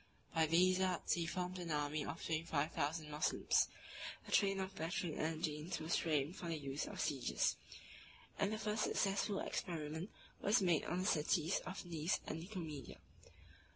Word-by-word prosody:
412 - - -24 0.2
By 165 - +6
these 185 +1 +5
arts 185 -2 +2
he 170 -1 0
formed 180 +1 -2
an 175 -1 -4
army 150 0 0
of 150 +4 -5
twenty 160 -1 +1
five 155 -2 0
thousand 155 0 -1
Moslems: 150 +1 +3 0.6
a - - -8
train 195 -1 +4
of 190 0 -3
battering 165 -2 -2
engines 155 0 -1
was 160 +1 0
framed 155 0 +1
for 180 - -6
the 165 -1 -1
use 140 0 -3
of - - -7
sieges; 135 -4 +1 0.8
and 200 0 +2
the 215 - -1
first 215 0 -1
successful 200 0 +1
experiment 160 +1 -3 0.3
was 210 +4 +5
made 175 -5 +3
on 180 - 0
the - - -1
cities 165 -1 +2
of 185 0 -5
Nice 165 +1 0
and 160 - -3
Nicomedia. 165 - -6
165 Hz, 170 wpm, -39 LUFS, 155-185 Hz, 0.8 s, By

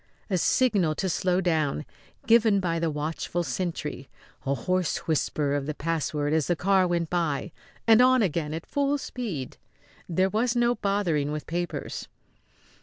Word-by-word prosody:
A 185 - +3
signal 195 -9 +2
to 190 - -1
slow 180 +1 +1
down, 155 -4 0 0.4
given 225 -3 +5
by 170 -3 -1
the 165 0 0
watchful 155 +3 -2
sentry, 150 -2 -4 0.4
a 140 - +2
hoarse 180 +8 0
whisper 150 -2 0
of 145 -1 -1
the 155 - -3
password 150 -2 -1
as 160 -3 +1
the 175 - +2
car 190 +1 +3
went 170 -2 -1
by, 170 -2 -1 0.3
and 225 +1 +7
on 255 -1 +5
again 160 -4 -1
at 165 - -6
full 285 0 0
speed. 210 - -5 0.5
There 185 +3 +2
was 235 +3 +1
no 240 0 +3
bothering 180 -10 0
with 150 0 -4
papers. 175 +1 -4
175 Hz, 155 wpm, -26 LUFS, 155-200 Hz, 0.5 s, and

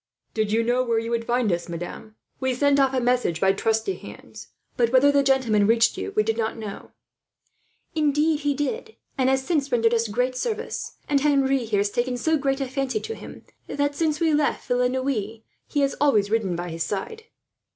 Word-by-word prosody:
"Did 215 -2 0
you 225 +1 +2
know 245 +2 +2
where 235 -2 0
you 230 +1 -2
would 230 -1 -1
find 240 -3 +1
us, 175 0 -2
madame? 175 +5 -7 0.2
We 260 -1 0
sent 285 +2 +3
off 270 -1 +4
a - - +2
message 245 -9 +1
by 190 +1 +3
trusty 220 0 0
hands, 110 -2 -11 0.3
but 235 -2 +2
whether 260 +2 +5
the 285 0 +4
gentleman 255 -7 +2
reached 230 0 +3
you - - -4
we 215 - +3
know 225 0 0
not." 215 -3 -8 1.0
"Indeed 305 0 +2
he 290 -1 0
did, 445 - -3 0.2
and 260 -1 +2
has 265 0 +1
since 290 -5 0
rendered 230 -1 +3
us 230 0 +1
good 250 +4 -1
service; 455 - -4
and 280 -1 +2
Henri 275 -3 +2
here 210 -3 +1
has 205 0 -1
taken 245 +2 -1
so 315 +6 +1
great 275 -2 0
a 270 - -2
fancy 260 -3 -2
to 450 - -5
him - - -11 0.2
that, 285 0 -1
since 305 0 0
we 325 -2 +2
left 295 0 0
Villeneuve, 250 -3 -1 0.3
he 290 - 0
has 275 0 +1
always 215 -8 +3
ridden 210 -6 +1
by 175 +1 -4
his 165 0 -6
side." 435 - -4
250 Hz, 200 wpm, -24 LUFS, 220-280 Hz, 1.0 s, whether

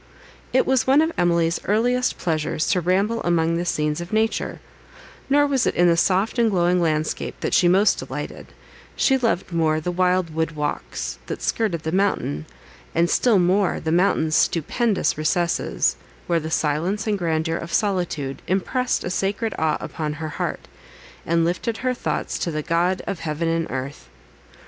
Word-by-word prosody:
It 260 - +3
was 260 -1 +1
one 270 +2 +5
of 320 - 0
Emily's 170 -1 +2
earliest 245 +4 +1
pleasures 155 -2 -1
to 180 - +2
ramble 195 +6 +1
among 165 -1 +1
the 175 - -2
scenes 150 -1 -1
of 175 - -8
nature; 220 +1 0 0.7
nor 290 +1 +4
was 270 -3 +1
it - - 0
in 175 - +4
the 170 - +4
soft 190 +7 +1
and 230 -1 +4
glowing 180 -2 +2
landscape 155 -2 -1
that - - -2
she 175 - +5
most 190 +4 +4
delighted; - - -6 0.5
she 270 - +3
loved 225 -8 -1
more 160 -2 +2
the 175 +3 -3
wild 180 -2 +1
wood 160 +1 -1
walks, 150 -1 -4
that - - -5
skirted 185 -9 -1
the 160 - -2
mountain; 175 - 0 0.5
and 170 +1 +2
still 235 -5 +3
more 185 +2 +2
the 160 - -2
mountain's 165 -3 +2
stupendous 200 - +1
recesses, 155 - 0 0.3
where 170 -1 +1
the 160 0 -5
silence 160 +7 0
and 210 -2 0
grandeur 165 -1 0
of 170 0 -7
solitude 175 -9 -1
impressed 245 +7 0
a 180 - -3
sacred 200 +4 -1
awe 160 -1 +1
upon 150 -2 -4
her 155 +1 -5
heart, 150 - -4 0.6
and 165 0 +2
lifted 215 +7 -1
her 255 0 -1
thoughts - - -3
to - - -1
the 155 -2 -3
GOD 175 +3 0
OF 195 -4 -4
HEAVEN 160 +1 -2
AND 165 0 0
EARTH. 130 - -6
175 Hz, 170 wpm, -22 LUFS, 160-205 Hz, 0.7 s, one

